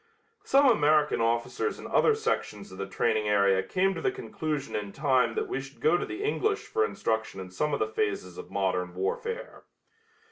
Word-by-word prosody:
Some 275 +1 +5
American 150 - +3
officers 115 - 0
in - - -10
other 445 - +3
sections 435 - -2
of 95 - -11
the 100 - -3
training 110 -1 0
area 100 -2 +4
came 185 - +1
to - - -5
the 390 - +1
conclusion 160 - -4
in 105 -1 -3
time 130 -5 +2
that - - -1
we 135 - -2
should 135 +1 -12
go 155 +3 +3
to - - -1
the 360 +4 -5
English 425 0 0
for 435 +1 0
instruction 110 - -2
in 95 -1 -8
some 150 +11 -1
of 145 - +1
the - - +2
phases 100 -4 -2
of - - -9
modern 90 -2 -1
warfare. 460 - -4
135 Hz, 190 wpm, -28 LUFS, -, -, Some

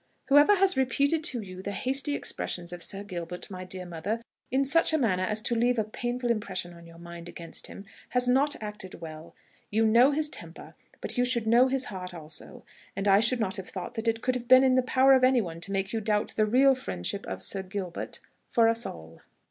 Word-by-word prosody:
"Whoever 290 +8 +7
has 385 -2 +3
repeated 280 +4 +1
to 245 -3 0
you 185 -2 -9
the 200 +1 -4
hasty 270 +7 -1
expressions 175 -9 -4
of 175 - -8
Sir 195 +3 -4
Gilbert, 180 -1 -6
my 185 -1 -6
dear 185 0 -7
mother, 180 +7 -4 0.3
in 270 +2 +1
such 330 +4 +3
a - - +4
manner 205 -10 +1
as 210 +3 -1
to - - 0
leave 240 +1 +2
a 220 - +2
painful 240 +3 -2
impression 190 -5 -3
on 170 0 -14
your 165 0 -14
mind 170 0 -9
against 170 -1 -6
him, 200 - -10 0.2
has 250 0 +1
not 275 +4 +3
acted 210 -3 -7
well. 160 -1 -10 0.3
You 220 +2 +2
know 235 +5 +6
his 300 +1 0
temper, 295 - -8 0.3
but - - -1
you 245 - +4 0.2
know 240 +3 +5
his 265 0 +1
heart 180 -3 -7
also; 155 -1 -6 0.3
and 195 +1 -2
I 195 0 +6
should 235 +3 +2
not 210 -1 -1
have 190 - -7
thought 185 +4 -6
that 230 -1 -3
it 225 0 0
could 255 - +1
have 245 -1 -5
been 255 +1 +8
in 260 -1 +4
the 255 - +4
power 260 +1 +4
of 260 -1 +4
any 255 -1 +5
one 170 -6 -5
to 195 - -5
make 195 +1 -2
you 225 - -1
doubt 210 -1 0
the 215 -1 +2
real 265 +5 +5
friendship 195 - -4
of - - -5
Sir 195 - -2
Gilbert 190 -2 -6 0.3
for 230 -2 +4
us 230 +1 0
all." 80 0 -10
220 Hz, 225 wpm, -28 LUFS, 185-255 Hz, 0.3 s, been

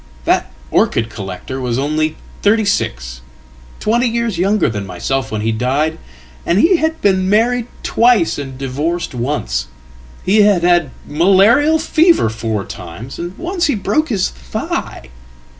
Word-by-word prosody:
"That - - +1 0.2
orchid 115 -1 +1
collector 100 +7 -6
was 125 -2 -1
only 155 +3 0 0.3
thirty 215 +1 +3
six 65 - -2 0.6
twenty 235 +3 +1
years 230 -5 -1
younger 200 +3 +2
thanmyself 105 +5 -3
when 110 -1 -3
he 110 +1 0
died. 135 +8 0 0.4
And 170 - +1
he 335 - +5
had 320 0 -1
been 190 -2 +2
married 230 +3 +2 0.2
twice 230 -10 +3
and 135 -2 -7
divorced 145 +6 -3
once; 65 - -2 0.6
hehad 205 -2 +4
had 175 -4 +3 0.2
malarial 200 - +4
fever 325 - +3
four 110 -2 -3
times, 110 +11 -9
and 175 +2 -6
once 350 0 -1
he 285 - +1
broke 210 +11 0
his 200 -6 0
thigh. 65 0 -5
170 Hz, 135 wpm, -17 LUFS, -, 0.6 s, he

